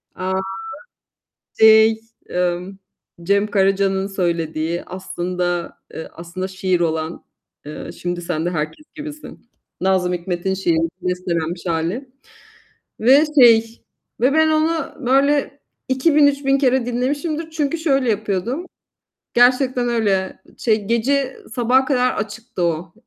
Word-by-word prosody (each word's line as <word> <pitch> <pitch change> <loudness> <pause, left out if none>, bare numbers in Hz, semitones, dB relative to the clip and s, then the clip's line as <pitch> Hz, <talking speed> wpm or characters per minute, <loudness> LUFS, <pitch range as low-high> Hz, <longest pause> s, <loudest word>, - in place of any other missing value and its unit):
A! 185 0 -3 1.3
Şey, 220 0 +6 0.3
ımm, 180 +2 -2 0.4
Cem 200 +3 +2
Karaca'nın 195 -1 +1
söylediği, 170 -3 -2
aslında, 180 -1 -3 0.2
eee, 160 - -7
aslında 175 +3 -6
şiir 185 -1 -1
olan, 160 -1 -2 0.4
eee, 150 - -7
şimdi 175 0 -4
sen 170 -2 -2
de - - +1
herkes 155 - -4
gibisin, 305 0 -10 0.3
Nazım 185 -1 +1
Hikmet'in 175 +1 -2
şiiri, 165 -3 +1
bestelenmiş 175 -2 -2
hâli 175 - -2 0.9
ve 270 +6 +6 0.2
şey 230 -1 +5 0.4
ve 255 +3 +3
ben 315 +1 +4
onu 315 +1 0
böyle 280 +2 +2 0.3
2000-3000 280 0 +3
kere 260 -2 +2
dinlemişimdir 290 +6 -2
çünkü 315 0 -1
şöyle 275 -6 +1
yapıyordum. 215 - -2 0.7
Gerçekten 250 0 +3
öyle. 200 -6 0 0.2
Şey 215 -3 +1
gece 260 +4 0 0.2
sabaha 250 +2 +3
kadar 255 -2 +2
açıktı 215 -2 -5
o. 170 0 -1
210 Hz, 110 wpm, -20 LUFS, 180-260 Hz, 1.3 s, Şey